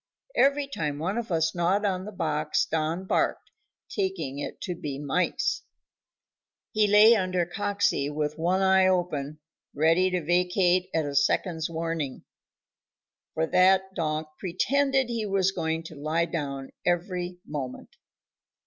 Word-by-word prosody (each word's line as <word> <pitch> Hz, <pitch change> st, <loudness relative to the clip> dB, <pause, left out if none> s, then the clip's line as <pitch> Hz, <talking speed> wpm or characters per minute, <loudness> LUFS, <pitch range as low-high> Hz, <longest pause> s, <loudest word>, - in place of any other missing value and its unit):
Every 280 Hz, +1 st, +3 dB
time 150 Hz, -, -3 dB
one 190 Hz, +9 st, -1 dB
of 230 Hz, -4 st, -6 dB
us 165 Hz, -1 st, +1 dB
gnawed 180 Hz, +4 st, +1 dB
on 185 Hz, -2 st, -1 dB
the 210 Hz, -, -7 dB
box 155 Hz, -5 st, 0 dB
Don 160 Hz, +3 st, -2 dB
barked, -, -, 0 dB, 0.4 s
taking 380 Hz, -, -3 dB
it 145 Hz, -, -6 dB
to 180 Hz, -, -3 dB
be 145 Hz, -5 st, -5 dB
mice. 145 Hz, +5 st, 0 dB, 1.1 s
He 215 Hz, -1 st, +3 dB
lay 210 Hz, +3 st, +7 dB
under 185 Hz, -3 st, 0 dB
Coxey 200 Hz, -5 st, 0 dB
with 150 Hz, 0 st, -2 dB
one 180 Hz, +4 st, +1 dB
eye 190 Hz, 0 st, +5 dB
open, 155 Hz, -6 st, -1 dB, 0.4 s
ready 165 Hz, +5 st, +3 dB
to 180 Hz, -3 st, -2 dB
vacate 180 Hz, +1 st, +2 dB
at 160 Hz, -2 st, 0 dB
a 145 Hz, -, -4 dB
second's 160 Hz, +3 st, +1 dB
warning, 165 Hz, -4 st, -3 dB, 1.1 s
for 160 Hz, -, +1 dB
that 190 Hz, +2 st, +3 dB
donk 155 Hz, -3 st, -2 dB
pretended 270 Hz, +8 st, +1 dB
he 230 Hz, -3 st, -2 dB
was 195 Hz, -1 st, +2 dB
going 160 Hz, -2 st, -2 dB
to 160 Hz, -1 st, -10 dB
lie 155 Hz, +4 st, 0 dB
down 140 Hz, -5 st, -4 dB
every 180 Hz, 0 st, -1 dB
moment. 135 Hz, -4 st, -6 dB
175 Hz, 140 wpm, -27 LUFS, 155-190 Hz, 1.1 s, lay